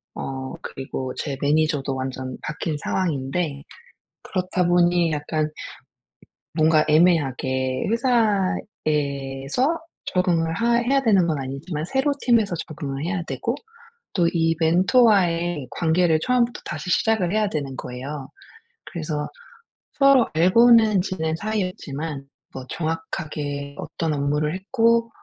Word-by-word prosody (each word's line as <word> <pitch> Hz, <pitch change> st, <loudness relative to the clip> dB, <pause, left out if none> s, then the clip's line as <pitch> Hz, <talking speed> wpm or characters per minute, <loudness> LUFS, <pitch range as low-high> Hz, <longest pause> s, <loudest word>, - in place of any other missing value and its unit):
어 130 Hz, -1 st, -5 dB
그리고 130 Hz, -1 st, -5 dB
제 140 Hz, -3 st, -4 dB
매니저도 145 Hz, -2 st, +1 dB
완전 130 Hz, -1 st, -4 dB
바뀐 150 Hz, +1 st, -3 dB
상황인데 145 Hz, -3 st, -2 dB, 0.6 s
그렇다 185 Hz, -1 st, -1 dB
보니 175 Hz, -1 st, +3 dB
약간 155 Hz, +1 st, -1 dB, 1.1 s
뭔가 155 Hz, -1 st, +4 dB
애매하게 135 Hz, -5 st, +2 dB
회사에서 195 Hz, -, 0 dB, 0.3 s
적응을 170 Hz, -3 st, +1 dB
하 235 Hz, +6 st, +2 dB
해야 265 Hz, +3 st, +2 dB
되는 200 Hz, -8 st, +4 dB
건 155 Hz, -3 st, 0 dB
아니지만 140 Hz, +4 st, -4 dB
새로 265 Hz, -, +1 dB
팀에서 225 Hz, -7 st, +3 dB
적응을 140 Hz, -2 st, -5 dB
해야 180 Hz, +1 st, -2 dB
되고, -, -, -3 dB, 0.6 s
또 175 Hz, -3 st, +3 dB
이 165 Hz, -1 st, +2 dB
멘토와의 175 Hz, -, +3 dB
관계를 165 Hz, -1 st, +2 dB
처음부터 245 Hz, +1 st, +1 dB
다시 185 Hz, -, -5 dB
시작을 200 Hz, -3 st, +2 dB
해야 215 Hz, 0 st, +2 dB
되는 140 Hz, -6 st, -4 dB
거예요. 135 Hz, +2 st, -6 dB, 0.6 s
그래서 155 Hz, -3 st, -4 dB, 0.6 s
서로 275 Hz, -4 st, +5 dB
알고는 215 Hz, +4 st, +5 dB
지낸 160 Hz, -4 st, -2 dB
사이였지만 165 Hz, -8 st, -4 dB, 0.3 s
뭐 130 Hz, -1 st, -7 dB
정확하게 150 Hz, -3 st, -4 dB
어떤 160 Hz, -2 st, -3 dB
업무를 150 Hz, +2 st, 0 dB
했고 230 Hz, +3 st, +2 dB
165 Hz, 265 characters per minute, -23 LUFS, 145-195 Hz, 1.1 s, 서로